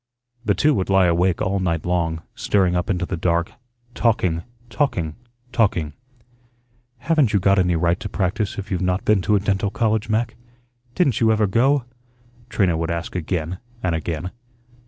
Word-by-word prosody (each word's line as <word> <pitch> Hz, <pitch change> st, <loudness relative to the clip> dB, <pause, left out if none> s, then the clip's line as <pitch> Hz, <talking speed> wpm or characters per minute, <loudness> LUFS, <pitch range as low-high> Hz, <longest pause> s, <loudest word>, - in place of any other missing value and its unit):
The 100 Hz, -4 st, +1 dB
two 150 Hz, 0 st, +3 dB
would 95 Hz, -7 st, -1 dB
lie 95 Hz, -1 st, +5 dB
awake 90 Hz, +1 st, +2 dB
all 95 Hz, +1 st, 0 dB
night 85 Hz, -4 st, -1 dB
long, 85 Hz, -2 st, -1 dB
staring 95 Hz, -3 st, +1 dB
up 90 Hz, +1 st, -1 dB
into 90 Hz, -2 st, 0 dB
the 95 Hz, -, -3 dB
dark, 85 Hz, 0 st, 0 dB, 0.4 s
talking, 90 Hz, -10 st, +1 dB, 0.3 s
talking, 105 Hz, -, -1 dB, 0.4 s
talking. 90 Hz, -, +1 dB, 1.0 s
"Haven't 140 Hz, -2 st, +2 dB
you 100 Hz, -, +4 dB
got 100 Hz, +1 st, +3 dB
any 90 Hz, -2 st, +2 dB
right 85 Hz, +2 st, +1 dB
to 105 Hz, -, -5 dB
practise 95 Hz, +2 st, -1 dB
if 100 Hz, 0 st, -6 dB
you've 90 Hz, -1 st, -1 dB
not 90 Hz, +1 st, 0 dB
been 105 Hz, -3 st, +3 dB
to 105 Hz, +3 st, +2 dB
a -, -, +4 dB
dental 100 Hz, 0 st, 0 dB
college, 110 Hz, 0 st, 0 dB
Mac? 115 Hz, +2 st, 0 dB, 0.6 s
Didn't 140 Hz, -, +2 dB
you 110 Hz, -1 st, +5 dB
ever 110 Hz, -1 st, +3 dB
go?" 125 Hz, +7 st, +2 dB, 0.7 s
Trina 95 Hz, -5 st, +2 dB
would 80 Hz, 0 st, -2 dB
ask 85 Hz, +1 st, -4 dB
again 90 Hz, 0 st, -2 dB, 0.2 s
and 90 Hz, -2 st, +1 dB
again. 80 Hz, +2 st, -3 dB
95 Hz, 170 wpm, -22 LUFS, 85-110 Hz, 1.0 s, lie